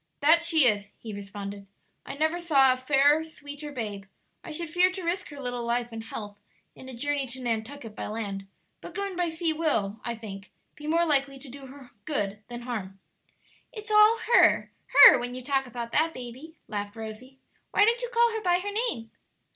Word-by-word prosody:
"That 325 Hz, +4 st, +5 dB
she 325 Hz, -4 st, +5 dB
is!" 205 Hz, -4 st, +2 dB
he 220 Hz, -2 st, -8 dB
responded; 200 Hz, 0 st, -8 dB, 0.4 s
"I -, -, -5 dB
never 315 Hz, +4 st, 0 dB
saw 275 Hz, -6 st, +4 dB
a -, -, -4 dB
fairer, 285 Hz, +4 st, +3 dB
sweeter 295 Hz, -2 st, -9 dB
babe. 210 Hz, -7 st, -5 dB, 0.4 s
I -, -, -9 dB
should 335 Hz, +2 st, -3 dB
fear 360 Hz, +3 st, +4 dB
to 370 Hz, 0 st, -7 dB
risk 350 Hz, +3 st, -2 dB
her 290 Hz, -2 st, -10 dB
little 245 Hz, -2 st, -4 dB
life 235 Hz, 0 st, -1 dB
and 225 Hz, -1 st, -7 dB
health 205 Hz, -2 st, -8 dB, 0.3 s
in 260 Hz, -, -12 dB
a 255 Hz, -, -8 dB
journey 285 Hz, +2 st, -2 dB
to 255 Hz, +2 st, -7 dB
Nantucket 230 Hz, 0 st, -4 dB
by -, -, -5 dB
land; 200 Hz, -3 st, -5 dB, 0.3 s
but -, -, -10 dB
going 400 Hz, -2 st, -3 dB
by 350 Hz, -1 st, 0 dB
sea 325 Hz, 0 st, -1 dB
will, 225 Hz, -10 st, -1 dB
I 235 Hz, -, -3 dB
think, 205 Hz, -3 st, -9 dB, 0.3 s
be 300 Hz, -, -9 dB
more 335 Hz, +2 st, +2 dB
likely 275 Hz, -3 st, +1 dB
to 265 Hz, 0 st, -11 dB
do 270 Hz, +1 st, -10 dB
her 265 Hz, -1 st, -13 dB
good 205 Hz, -9 st, -2 dB
than 240 Hz, 0 st, -7 dB
harm." 205 Hz, -6 st, -6 dB, 0.7 s
"It's 430 Hz, -1 st, -8 dB
all 425 Hz, +2 st, +6 dB, 0.2 s
her, -, -, +5 dB, 0.2 s
her, -, -, +9 dB
when 245 Hz, 0 st, -5 dB
you 255 Hz, -, -7 dB
talk 270 Hz, 0 st, 0 dB
about 235 Hz, -1 st, -6 dB
that 320 Hz, +5 st, +1 dB
baby," 255 Hz, +6 st, -9 dB
laughed 205 Hz, -1 st, -5 dB
Rosie; 225 Hz, +4 st, -9 dB, 0.3 s
"why 410 Hz, -, +4 dB
don't 470 Hz, +2 st, +2 dB
you -, -, -3 dB
call 470 Hz, -1 st, +3 dB
her 445 Hz, -1 st, -3 dB
by 355 Hz, -3 st, +3 dB
her 400 Hz, +3 st, -4 dB
name?" 405 Hz, -, -2 dB
270 Hz, 200 wpm, -27 LUFS, 225-325 Hz, 0.7 s, her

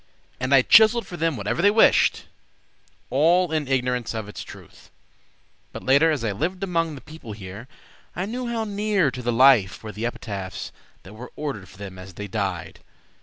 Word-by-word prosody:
And 130 Hz, +1 st, -2 dB
I 135 Hz, -2 st, +6 dB
chiseled 220 Hz, -, +6 dB
for 175 Hz, -, -8 dB
them 165 Hz, -4 st, -1 dB
whatever 105 Hz, +10 st, -2 dB
they 200 Hz, -, +6 dB
wished, 220 Hz, +2 st, +4 dB, 0.9 s
All 170 Hz, +5 st, +3 dB
in 155 Hz, -3 st, -1 dB
ignorance 125 Hz, -3 st, -1 dB
of 110 Hz, -2 st, -4 dB
the 105 Hz, -, -11 dB
truth. -, -, -12 dB, 0.8 s
But -, -, -8 dB
later, 140 Hz, +5 st, +4 dB
as 150 Hz, -7 st, -1 dB
I 110 Hz, -, 0 dB
lived 175 Hz, -, -3 dB
among 165 Hz, -4 st, -1 dB
the 135 Hz, -, -10 dB
people 155 Hz, -9 st, -10 dB
here, 100 Hz, +3 st, -9 dB, 0.5 s
I 180 Hz, -, -2 dB
knew 245 Hz, +4 st, -4 dB
how 230 Hz, -1 st, -2 dB
near 205 Hz, -7 st, 0 dB
to 125 Hz, -, -7 dB
the 120 Hz, 0 st, -1 dB
life 115 Hz, -6 st, +4 dB
Were 110 Hz, -, -6 dB
the 110 Hz, +4 st, -3 dB
epitaphs 100 Hz, -6 st, -6 dB, 0.3 s
that 95 Hz, -, -13 dB
were 120 Hz, +4 st, -10 dB
ordered 135 Hz, -, -5 dB
for -, -, -16 dB
them 95 Hz, -2 st, -9 dB
as 95 Hz, -1 st, -11 dB
they 105 Hz, -, -6 dB
died. -, -, -4 dB
130 Hz, 185 wpm, -23 LUFS, 105-175 Hz, 0.9 s, I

